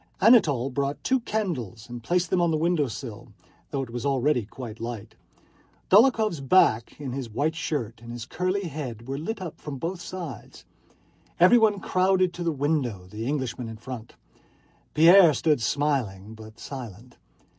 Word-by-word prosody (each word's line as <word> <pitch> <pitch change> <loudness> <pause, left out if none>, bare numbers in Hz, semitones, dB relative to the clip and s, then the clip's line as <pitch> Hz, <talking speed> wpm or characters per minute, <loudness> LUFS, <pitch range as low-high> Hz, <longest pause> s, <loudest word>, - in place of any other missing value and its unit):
Anatole 155 - +4
brought 140 +2 -2
two 260 0 +2
candles 160 - -4
and 120 -1 -8
placed 175 +7 0
them 185 - +2
on 170 - +3
the 160 - +1
window 160 -2 +1
sill, 115 -2 -8 0.4
though 140 -2 -2
it 120 - -9
was 120 0 -5
already 135 -3 +1
quite 115 -1 -9
light. 115 -2 -6 0.8
Dólokhov's 215 - +4
back 130 -6 +3
in 140 -3 -5
his 130 -2 -5
white 145 +9 -1
shirt, 125 -8 -4
and 115 0 -9
his 120 -1 -6
curly 185 +6 -2
head, 135 - -6
were 135 +1 -3
lit 190 +5 -4
up 170 - -8
from 145 -3 -6
both 170 +5 -4
sides. 175 - -8 0.7
Everyone 210 +2 +5
crowded 185 -1 +2
to 175 - -5
the 170 - +1
window, 135 - -1
the 110 +2 -5
Englishman 130 -4 -3
in 110 - -8
front. 115 -1 -9 0.8
Pierre 170 0 +7
stood 150 -1 +1
smiling 115 -7 -1
but 110 0 -12
silent. 120 -2 -9
140 Hz, 160 wpm, -26 LUFS, 120-175 Hz, 0.8 s, Pierre